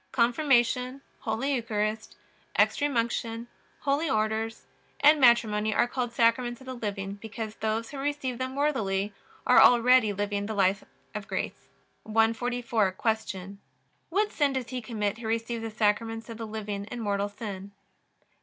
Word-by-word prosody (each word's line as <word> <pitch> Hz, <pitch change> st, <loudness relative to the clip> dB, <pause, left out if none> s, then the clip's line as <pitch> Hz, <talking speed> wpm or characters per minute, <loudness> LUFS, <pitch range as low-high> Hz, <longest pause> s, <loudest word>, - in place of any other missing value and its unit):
Confirmation, 250 Hz, +1 st, +2 dB, 0.2 s
Holy 230 Hz, +6 st, -1 dB
Eucharist, 220 Hz, -3 st, -2 dB, 0.4 s
Extreme 285 Hz, -3 st, +2 dB
Unction, 230 Hz, 0 st, -1 dB, 0.4 s
Holy 285 Hz, +3 st, +1 dB
Orders, 220 Hz, 0 st, -1 dB, 0.3 s
and 295 Hz, +1 st, +6 dB
Matrimony 220 Hz, -3 st, +4 dB
are -, -, +3 dB
called 245 Hz, -1 st, -2 dB
Sacraments 240 Hz, +1 st, +2 dB
of 265 Hz, -, -14 dB
the 260 Hz, -, -5 dB
living, 200 Hz, -4 st, -4 dB
because 220 Hz, -1 st, -5 dB
those 220 Hz, +1 st, -2 dB
who 280 Hz, -, -6 dB
receive 275 Hz, -3 st, -2 dB
them 260 Hz, +1 st, -3 dB
worthily 210 Hz, -9 st, 0 dB, 0.3 s
are -, -, +7 dB
already 245 Hz, -2 st, +6 dB
living 205 Hz, 0 st, -2 dB
the 220 Hz, -, -3 dB
life 195 Hz, 0 st, +2 dB, 0.3 s
of 210 Hz, -1 st, -5 dB
grace. 185 Hz, -7 st, -4 dB, 0.3 s
144. 225 Hz, -1 st, +1 dB
Q. 200 Hz, -2 st, -2 dB, 0.5 s
What 410 Hz, +5 st, +1 dB
sin 285 Hz, -3 st, +1 dB
does 260 Hz, -2 st, -3 dB
he 255 Hz, -1 st, -4 dB
commit 215 Hz, -2 st, -2 dB
who 230 Hz, -, -5 dB
receives 230 Hz, +1 st, -1 dB
the 225 Hz, -, -4 dB
Sacraments 225 Hz, +2 st, 0 dB
of 230 Hz, -, -7 dB
the 225 Hz, -, -4 dB
living 210 Hz, -2 st, -4 dB
in 240 Hz, +3 st, -7 dB
mortal 205 Hz, -2 st, -1 dB
sin? 200 Hz, -2 st, -7 dB
225 Hz, 145 wpm, -28 LUFS, 210-250 Hz, 0.5 s, are